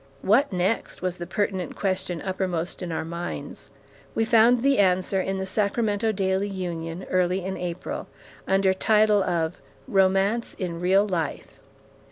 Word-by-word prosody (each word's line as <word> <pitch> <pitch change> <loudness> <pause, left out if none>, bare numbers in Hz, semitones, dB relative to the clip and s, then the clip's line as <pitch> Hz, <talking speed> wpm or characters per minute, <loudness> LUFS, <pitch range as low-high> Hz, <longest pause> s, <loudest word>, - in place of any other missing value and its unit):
"What 230 +8 +3
next?" 185 +2 -1
was 180 -1 -1
the 175 - -6
pertinent 195 -3 -2
question 185 -3 -2
uppermost 185 -3 -2
in 180 -2 -4
our 160 - -2
minds. 170 -3 -6 0.5
We 225 - +2
found 230 +1 +5
the 275 -3 +3
answer 185 0 +2
in 195 +1 -2
The 190 - -2
Sacramento 210 +2 0
Daily 190 -1 0
Union, 175 -3 -5
early 185 0 +1
in 190 0 -3
April, 175 0 -5 0.4
under 190 0 +3
title 210 +1 +3
of 170 -2 -1 0.3
"Romance 195 +1 +2
in 170 -3 -4
Real 190 +3 +3
Life." 170 -6 -3
190 Hz, 145 wpm, -25 LUFS, 180-205 Hz, 0.5 s, found